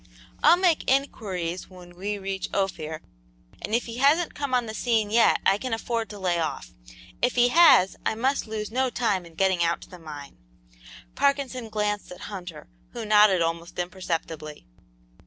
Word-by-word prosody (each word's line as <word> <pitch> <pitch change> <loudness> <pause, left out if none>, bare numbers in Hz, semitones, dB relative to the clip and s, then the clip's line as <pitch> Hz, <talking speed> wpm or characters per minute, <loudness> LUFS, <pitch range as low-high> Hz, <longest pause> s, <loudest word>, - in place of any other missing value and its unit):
I'll 345 - +7
make 355 -4 +2
inquiries 190 -10 -1
when 180 -2 -14
we 205 +3 -3
reach 195 -1 -4
Ophir, 160 -5 -2 0.6
and 215 - -1
if 240 - 0
he 230 0 -7
hasn't 300 +6 +3
come 285 -2 -4
on 245 -1 +1
the 220 - -6
scene 220 -3 0
yet 230 +1 +4
I 195 +1 +4
can 255 -1 -2
afford 230 0 -3
to 210 - -8
lay 180 -3 0
off; 155 -4 -4 0.5
if 245 +1 +1
he 245 0 +4
has, 305 - +6
I - - 0
must 260 +2 0
lose 215 -1 -5
no 260 +2 +1
time 200 -8 -1
in 165 - -17
getting 190 -1 +2
out 170 0 +1
to - - -13
the 180 - -11
mine." 150 -3 -10 0.7
Parkinson 275 -4 0
glanced 210 -2 -2
at 180 - -10
Hunter, 180 -6 -8 0.3
who - - -5
nodded 210 -4 +5
almost 165 +1 -4
imperceptibly. 165 -4 -4
205 Hz, 175 wpm, -25 LUFS, 175-245 Hz, 0.7 s, I'll